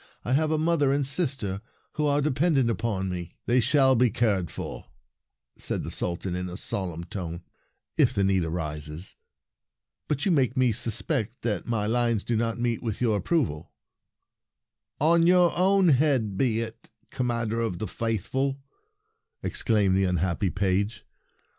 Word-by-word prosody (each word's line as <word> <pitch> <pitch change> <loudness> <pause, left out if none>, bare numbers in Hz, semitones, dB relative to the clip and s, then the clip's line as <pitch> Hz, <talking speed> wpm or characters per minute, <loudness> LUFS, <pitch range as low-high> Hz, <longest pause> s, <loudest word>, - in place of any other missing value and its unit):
I 125 - 0
have 155 +3 +2
a 155 - +1
mother 155 -3 +2
and 140 0 +1
sister 130 - -1 0.3
who 150 -1 -1
are 145 0 +2
dependent 140 -3 +2
upon 110 -4 -2
me 90 -2 -5
— - - -51
" - - -57
They 120 +2 +3
shall 130 +2 +4
be 125 +1 +4
cared 105 -8 +1
for," - - -6
(4 - - -26 0.7
Verses - - -5
73 - - 0
said - - -3
the - - -4
Sultan 90 +1 -2
in 90 0 -3
a 90 - -7
solemn 90 -5 -3
tone, 85 -1 -6 0.3
" - - -50
if - - +5
the 100 - 0
need 95 -2 +2
arises. 80 0 -4 0.9
But 145 -2 -1
you 195 - +3
make 130 -6 +2
me 130 -2 +4
suspect 115 - -2
that 105 -6 -2
my 115 -3 0
lines 115 -1 +1
do 120 - -1
not 115 +1 0
meet 120 -1 0
with 115 -4 -3
your 115 -4 +2
approval." 105 - -1 1.3
"On 165 +3 +4
your 180 -1 +5
own 190 0 +4
head 130 -8 +2
be 115 0 +1
it, 115 0 -8 0.2
Commander 115 -2 -1
of 110 -6 -2
the 110 - -4
Faithful! 120 +7 -2 0.4
" - - -48
exclaimed 100 -4 +1
the 95 0 +3
unhappy 90 +1 0
page. 100 +3 -1
115 Hz, 170 wpm, -26 LUFS, 95-135 Hz, 1.3 s, if